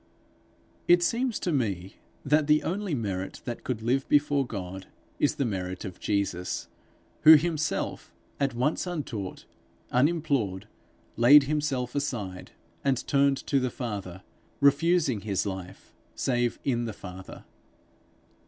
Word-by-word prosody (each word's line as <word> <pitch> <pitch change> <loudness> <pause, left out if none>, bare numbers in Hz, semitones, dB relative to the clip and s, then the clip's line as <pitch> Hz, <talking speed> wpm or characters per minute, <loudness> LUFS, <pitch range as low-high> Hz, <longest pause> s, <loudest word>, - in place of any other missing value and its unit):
It 175 0 +6
seems 240 +4 0
to 175 - -1
me 100 - -2 0.3
that 150 +1 +3
the 150 0 +4
only 190 -2 -2
merit 95 -5 -4
that 120 -2 -5
could 115 -4 -3
live 130 +3 0
before 145 -2 +3
God, 95 -3 -6 0.3
is 145 - +2
the 140 - 0
merit 95 -3 -4
of 95 -2 -8
Jesus 100 -3 -2 0.5
who 155 +1 +10
of 150 - +3
himself, 160 -3 -2 0.3
at 135 -3 0
once, 150 +9 0
untaught, 125 - -5 0.5
unimplored, 135 - +1 0.5
laid 135 +6 +8
himself 135 -4 -1
aside, 105 -10 -3 0.3
and 135 -2 0
turned 140 -1 +3
to 140 - +2
the 130 -1 0
Father, 100 -7 -6 0.4
refusing 140 - +3
his 100 -2 -1
life 95 -1 -7 0.2
save 120 -2 0
in 120 -3 0
the 110 - -4
Father. 95 -1 -10
125 Hz, 130 wpm, -27 LUFS, 100-150 Hz, 0.5 s, who